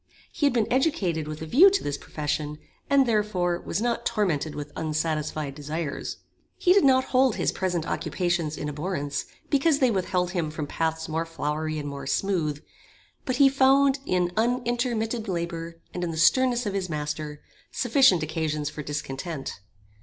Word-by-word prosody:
He 290 - +1
had 280 - +1
been 230 -3 +2
educated 190 - +1
with 155 +1 -6
a - - -4
view 305 - +7
to 395 - 0
this 145 - -2
profession, 150 0 -3 0.3
and, 280 -1 +5
therefore, 205 -6 0
was 175 - -2
not 240 -1 0
tormented 160 -7 0
with 145 0 -6
unsatisfied 155 -2 -2
desires. 150 +1 -4 0.4
He 360 - +4
did 400 - +5
not 260 -1 +5
hold 255 -2 +4
his - - 0
present 180 -4 -1
occupations 165 -1 -1
in 150 - -4
abhorrence, 150 -1 -3 0.3
because 285 +1 +3
they 260 -4 +3
withheld 180 -2 0
him 170 -4 -1
from 155 -1 -4
paths 160 +1 -2
more 165 +1 -2
flowery 155 -1 -2
and 145 -1 -4
more 140 -1 -6
smooth, 155 -3 0 0.6
but 255 - 0
he 275 +1 +6
found 270 +1 +4
in 180 -1 +1
unintermitted 240 -1 0
labour, 170 -2 -4 0.2
and 180 - -3
in 175 - -1
the 160 - -4
sternness 250 +7 +3
of 205 - -2
his 190 -2 -2
master, 150 -1 -4 0.3
sufficient 245 - +4
occasions 155 -2 -2
for 150 - -6
discontent. 145 - -5
170 Hz, 165 wpm, -26 LUFS, 155-240 Hz, 0.6 s, view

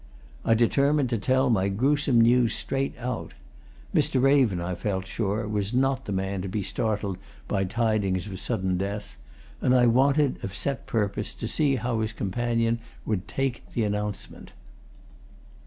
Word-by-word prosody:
I 115 - +3
determined 140 +4 +2
to 115 - 0
tell 130 +4 +2
my 100 -3 +2
gruesome 135 +4 +2
news 120 0 +4
straight 135 0 -2
out 125 +1 -5 0.6
Mr. 130 - +2
Raven, 130 -8 +4
I 85 +1 -3
felt 95 +1 -2
sure, 105 +2 -2
was 105 +1 -2
not 135 0 +1
the - - -5
man 95 0 -2
to 95 - -4
be 100 +2 -2
startled 105 -2 -1 0.3
by 95 -1 0
tidings 100 -3 0
of 95 -3 -5
sudden 95 -1 -1
death, 100 +2 -5 0.4
and 130 - +3
I 125 -1 +5
wanted, 135 +4 +3
of 95 - -5
set 140 -4 -2
purpose, 105 -2 -1
to 115 - -4
see 135 +5 +2
how 120 -1 -1
his 110 0 -1
companion 115 +3 0 0.3
would 95 -5 -2
take 135 -3 -2
the 115 - +1
announcement. 105 0 -4
110 Hz, 155 wpm, -26 LUFS, 100-125 Hz, 0.6 s, I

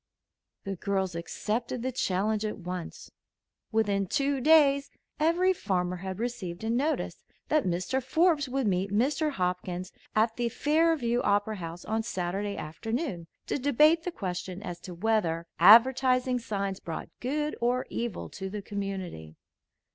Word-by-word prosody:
The 195 0 -3
girls 190 0 -1
accepted 225 +8 -3
the 260 - -1
challenge 210 -2 0
at 215 - -3
once. 180 -2 -7 0.6
Within 205 -3 +1
two 280 - 0
days 280 -2 +5 0.3
every 345 +4 +3
farmer 180 - -1
had 190 0 -5
received 220 -6 -4
a 225 - 0
notice 280 +7 -1 0.3
that 305 -1 +3
Mr. 185 +9 0
Forbes 295 +1 +2
would 265 0 0
meet 190 -1 +1
Mr. 280 +9 +2
Hopkins 180 -1 -2 0.2
at 225 +1 +2
the 240 -1 0
Fairview 295 -3 +2
Opera 205 +1 +1
House 170 0 -7
on 220 +1 0
Saturday 200 -1 -3
afternoon 195 - -4 0.2
to - - -2
debate 300 +5 +4
the 360 - -4
question 185 - -5
as 175 -4 -6
to 180 0 -9
whether 175 -4 0
advertising 255 +5 +6
signs 200 -4 -3
brought 165 - -6
good 295 +4 -1
or 245 +2 +1
evil 235 -5 -3
to 190 0 -6
the 205 0 -5
community. 190 - -5
220 Hz, 140 wpm, -28 LUFS, 185-260 Hz, 0.6 s, advertising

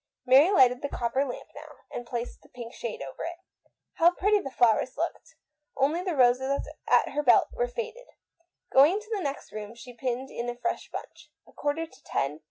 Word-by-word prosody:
Mary 270 +6 +7
lighted 255 -10 +5
the 285 - -3
copper 245 +2 0
lamp 260 -3 -6
now, - - -11 0.2
and 240 - -6
placed 240 0 -5
the - - -21
pink 240 -1 -9
shade 225 -10 -5
over 135 -1 -7
it. 340 +1 -5 0.6
How 335 +1 +7
pretty 415 +2 +3
the 275 - -5
flowers 245 +1 +2
looked! 335 +3 -4 0.4
Only 295 +6 +2
the 365 -3 -2
roses 265 +2 +2 0.2
at - - +4
her 295 +2 -1
belt 260 -5 +5
were - - 0
faded. 485 0 -6 0.7
She - - +6
went 290 +6 +7
into 430 +3 -5
the 400 - -3
next 280 -3 -4
room 215 +1 -7
and 245 -1 -12
pinned 260 +1 -3
in 240 +1 -4
a 240 - -4
fresh 245 - -3
bunch. - - -9 0.2
A - - -17
quarter 295 +3 -2
to 325 - -20
ten! 140 +3 -2
270 Hz, 200 wpm, -28 LUFS, 245-335 Hz, 0.7 s, Mary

